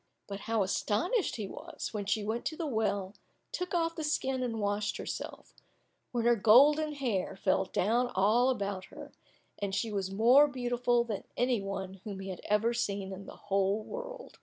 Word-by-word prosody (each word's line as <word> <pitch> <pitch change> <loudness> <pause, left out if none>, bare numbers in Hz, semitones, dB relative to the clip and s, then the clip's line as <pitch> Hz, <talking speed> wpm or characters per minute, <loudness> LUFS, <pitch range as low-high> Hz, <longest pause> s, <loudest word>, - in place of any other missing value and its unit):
But 200 -1 -6
how 225 -2 +1
astonished 225 - 0
he 215 - -4
was, - - -7
when 205 -2 -3
she 210 0 +1
went 220 +3 -2
to 315 - -2
the 335 - -2
well, 205 -7 -1 0.4
took 360 0 -3
off 330 -1 +1
the 320 - -4
skin 265 -3 0
and 230 -3 -2
washed 205 0 -1
herself, - - -6 0.6
when 235 -2 -1
her 240 0 +5
golden 285 +8 +6
hair 230 -10 -2
fell 190 0 +1
down 235 +7 +1
all 220 +7 +4
about 200 -6 -2
her, - - -11 0.5
and 200 -1 -2
she 225 +1 -1
was 195 -2 -2
more 240 +9 +6
beautiful 245 -2 +1
than 220 -4 -5
any 245 -3 +2
one 195 -1 -5
whom 200 -3 -6
he 195 0 -6
had 185 - -6
ever 215 +3 +2
seen 200 -4 -2
in 195 +1 -9
the - - -9
whole 200 +1 0
world. - - -8
220 Hz, 185 wpm, -31 LUFS, 200-255 Hz, 0.6 s, golden